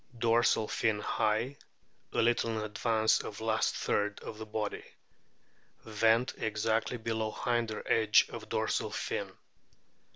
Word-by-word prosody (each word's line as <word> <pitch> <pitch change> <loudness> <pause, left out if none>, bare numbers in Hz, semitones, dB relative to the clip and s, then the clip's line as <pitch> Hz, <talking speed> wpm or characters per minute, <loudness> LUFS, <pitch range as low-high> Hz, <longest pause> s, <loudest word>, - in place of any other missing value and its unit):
Dorsal 115 -1 +3
fin 110 -1 0
high, 110 +6 0 0.5
a - - +1
little 115 -1 +1
in 110 - -2
advance 110 +1 +2
of 105 - -7
last 110 0 0
third 105 0 -1
of 110 0 -8
body. 105 -1 -3 1.0
Vent 110 +3 +2
exactly 110 +2 0
below 110 -1 -2
hinder 115 -2 -1
edge 110 -2 +4
of - - -8
dorsal - - 0
fin. - - -3
110 Hz, 120 wpm, -31 LUFS, 110-115 Hz, 1.0 s, edge